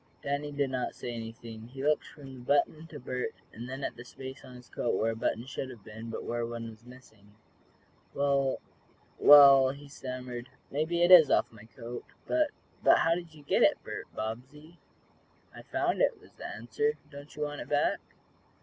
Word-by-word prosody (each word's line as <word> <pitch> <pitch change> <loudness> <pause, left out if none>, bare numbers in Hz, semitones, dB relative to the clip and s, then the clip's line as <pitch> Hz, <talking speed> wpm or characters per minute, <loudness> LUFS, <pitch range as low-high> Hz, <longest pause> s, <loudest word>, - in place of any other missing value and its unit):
Danny 145 +1 -2
did 140 -2 -1
not 130 -1 -2
say 120 - -5
anything. 115 0 -8
He 135 +2 -8
looked 150 +1 +2
from 135 -3 -12
the 130 - -10
button 145 +5 +1
to - - -9
Bert, 125 0 -4 0.2
and 120 +3 -8
then 135 +2 -6
at - - -3
the 120 - -8
space 130 +2 -9
on 130 -1 -12
his 125 -1 -13
coat - - -1
where 115 +1 +1
a - - -5
button 115 +1 -1
should 130 0 -5
have 120 -6 -12
been, 110 +2 -9
but - - -5
where 120 0 -2
one 115 -1 -5
was 110 +2 -17
missing. 110 -5 -17 0.8
"Well 140 -1 +1 0.6
well," 140 -2 +9
he 140 +2 -8
stammered. 125 -2 -7 0.2
"Maybe 160 +4 0
it 175 - +4
is 165 -5 +10
off - - +2
my 110 -1 -14
coat, 120 +1 -8 0.2
but 310 -1 +2 0.3
but - - +6
how 165 - +3
did 170 -2 -6
you 150 - -14
get - - +1
it, - - +5
Bert - - -6
Bobbsey?" 135 +9 -7 0.7
"I - - -10
found - - -1
it," - - +2
was 425 - -19
the - - -8
answer. 440 0 -1 0.2
"Don't 145 +1 -11
you 150 - -2
want 145 0 -4
it - - -9
back?" 145 0 +2
130 Hz, 195 wpm, -30 LUFS, 120-145 Hz, 0.8 s, is